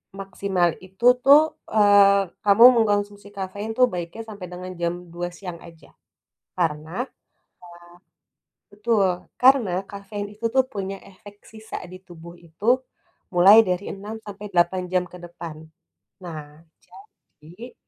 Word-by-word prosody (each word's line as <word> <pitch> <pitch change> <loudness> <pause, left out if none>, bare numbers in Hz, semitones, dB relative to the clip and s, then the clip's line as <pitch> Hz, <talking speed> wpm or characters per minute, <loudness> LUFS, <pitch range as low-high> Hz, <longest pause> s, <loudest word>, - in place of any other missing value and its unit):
maksimal 195 -2 -1 0.2
itu 190 +6 -7 0.2
tuh, 300 +3 +6 0.2
eee, 200 -2 +5 0.2
kamu 205 +3 +6 0.2
mengkonsumsi 205 -1 -2
kafein 200 +3 -5
tuh, 250 0 +5
baiknya 175 +5 -6
sampai 200 -4 -8
dengan 180 +1 -8
jam 170 0 0 0.2
2.00 175 0 -4
siang 175 -2 -9
aja. 165 -2 -17 0.6
Karena 160 +3 -2
a - - -24 1.6
betul. 205 -4 0 0.2
Karena, 250 -7 +5 0.2
kafein 205 +1 -7
itu 215 +2 -8
tuh, 265 0 +4
punya 195 -1 -4
efek 205 +2 -15 0.2
sisa 220 0 -9
di 185 - -9
tubuh 170 -1 -13
itu 175 +10 0 0.6
mulai 190 +5 +8
dari 180 +2 -2
6 205 +3 -8
sampai 205 0 -8
8 180 +1 +2
jam 180 -1 +1
ke - - -9
depan. 170 -2 -9 0.7
Nah, 155 -2 -10 0.8
jadi, 180 +11 -12
195 Hz, 130 wpm, -23 LUFS, 175-210 Hz, 1.6 s, mulai